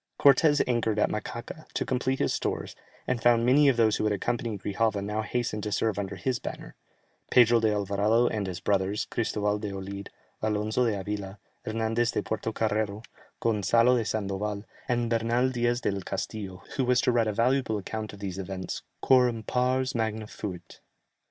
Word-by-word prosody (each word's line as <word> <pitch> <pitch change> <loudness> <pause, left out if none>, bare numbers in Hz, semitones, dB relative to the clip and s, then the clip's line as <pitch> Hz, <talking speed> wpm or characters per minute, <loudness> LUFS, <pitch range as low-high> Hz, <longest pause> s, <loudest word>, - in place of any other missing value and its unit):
Cortès 145 +2 +5
anchored 115 -3 +1
at 105 - +2
Macaca, 120 +8 -6
to - - 0
complete 130 +1 0
his - - +1
stores, - - -3 0.3
and 120 - -1
found 120 0 +4
many 140 +3 +6
of 130 - +1
those 110 -2 +4
who - - -1
had 105 -1 +2
accompanied 110 +1 -2
Grijalva 105 +1 0
now 105 +2 -2
hasten 115 -1 -2
to 105 - -3
serve 105 0 0
under 100 -1 -4
his 130 -2 -1
banner: - - -7 0.6
Pedro 120 -1 +6
de 110 -1 +2
Alvarado 105 +3 +2
and 105 -4 -1
his 90 -2 -4
brothers, 100 +1 0
Christoval 105 -2 0
de 105 -2 -3
Olid, 100 +1 -6 0.3
Alonzo 110 +3 +1
de 105 -3 0
Avila, 100 0 -5 0.3
Hernandez 115 +1 0
de - - -1
Puerto 110 0 -2
Carrero, 110 -1 -1 0.4
Gonzalo 115 +3 +3
de 120 - +1
Sandoval, 105 -1 -2 0.2
and 120 -1 +1
Bernal 115 +3 +2
Diaz 120 0 0
del 100 -3 -1
Castillo, 95 0 -5
who 135 - +2
was 125 0 +3
to - - +2
write 115 -2 +2
a 105 - 0
valuable 120 0 +1
account 110 +2 -5
of 100 - -11
these 100 -1 -5
events 95 -1 -5 0.2
"quorum 125 -4 +4
pars 130 +2 +1
magna 110 -1 -1
fuit." 90 -6 -8
110 Hz, 175 wpm, -28 LUFS, 100-120 Hz, 0.6 s, many